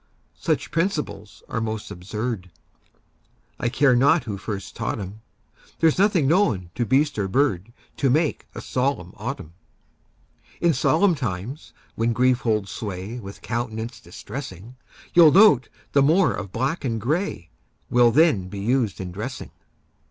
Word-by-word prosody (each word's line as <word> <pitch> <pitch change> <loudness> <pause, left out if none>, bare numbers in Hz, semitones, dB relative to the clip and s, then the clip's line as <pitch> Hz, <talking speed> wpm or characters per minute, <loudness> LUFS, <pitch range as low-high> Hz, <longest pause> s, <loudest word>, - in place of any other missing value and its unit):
Such - - -1
principles 150 - -2
are 115 - -3
most 110 -2 -4
absurd, 100 +1 -4 1.1
I 120 - 0
care 135 0 +3
not 140 +6 +4
who 105 -4 -4
first 100 0 -6
taught 115 -1 -3
'em; 100 +2 -7 0.6
There's 165 +1 +3
nothing 195 -8 +3
known 110 - +2
to 120 +2 -2
beast 140 -1 +2
or 100 - 0
bird 115 -3 0 0.3
To 135 - +2
make 155 +3 +1
a - - -5
solemn 125 -9 -2
autumn. 110 - -6 1.1
In 170 -1 +3
solemn 165 +8 +3
times, 125 - -5 0.2
when 115 +1 0
grief 125 +1 +3
holds 105 -4 -1
sway 105 +2 -5
With 100 -3 -10
countenance 115 -1 -4
distressing, 110 - -9 0.4
You'll 170 -3 +8
note 175 - +6 0.2
the 140 - +4
more 160 +4 +4
of 100 -2 -6
black 135 - -2
and 115 -4 -1
gray 140 - -2 0.4
Will 120 -1 +6
then 135 - +3
be 100 - -8
used 115 0 0
in 90 -1 -5
dressing. 110 +8 -6
120 Hz, 145 wpm, -23 LUFS, 100-145 Hz, 1.1 s, You'll